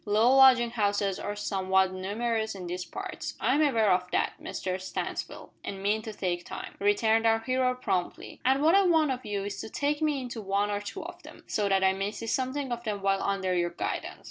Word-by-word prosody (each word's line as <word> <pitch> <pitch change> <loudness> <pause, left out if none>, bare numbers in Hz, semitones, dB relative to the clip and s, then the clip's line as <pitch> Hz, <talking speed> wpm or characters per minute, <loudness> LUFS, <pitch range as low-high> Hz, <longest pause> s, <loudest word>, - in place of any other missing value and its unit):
"Low 220 +5 +4
lodging 255 -3 +7
houses 205 -3 0
are 205 - -4
somewhat 190 -2 +1
numerous 220 +4 -2
in 185 -2 -7
these 180 +1 -4
parts." - - -6
"I 255 - +2
am 295 - +3
aware 230 -9 +3
of 180 0 +1
that, - - 0
Mr 185 0 -4
Stansfield, 190 - -5
and 195 -1 -6
mean 210 +2 +1
to 220 - -6
take 180 -4 -2
time," - - -7
returned 220 +3 +3
our 225 0 +4
hero 255 +2 0
promptly. 190 -8 -3
"And 265 +2 +3
what 320 +2 +5
I 395 - +6
want 320 -6 +3
of 255 0 -4
you 200 -1 -2
is 205 0 -5
to - - -7
take 290 +5 -1
me 300 -3 +1
into 245 -3 -6
one 200 +1 0
or 205 0 -1
two 205 - -6
of - - -9
them, - - -13
so 205 -2 0
that 195 -1 +3
I 190 0 +4
may 195 +1 -2
see 215 +2 -7
something 260 +3 -1
of 235 0 -3
them 205 -3 -3
while 195 0 +2
under 195 -2 0
your 175 -1 +1
guidance. 170 - -4
210 Hz, 220 wpm, -28 LUFS, 195-250 Hz, -, lodging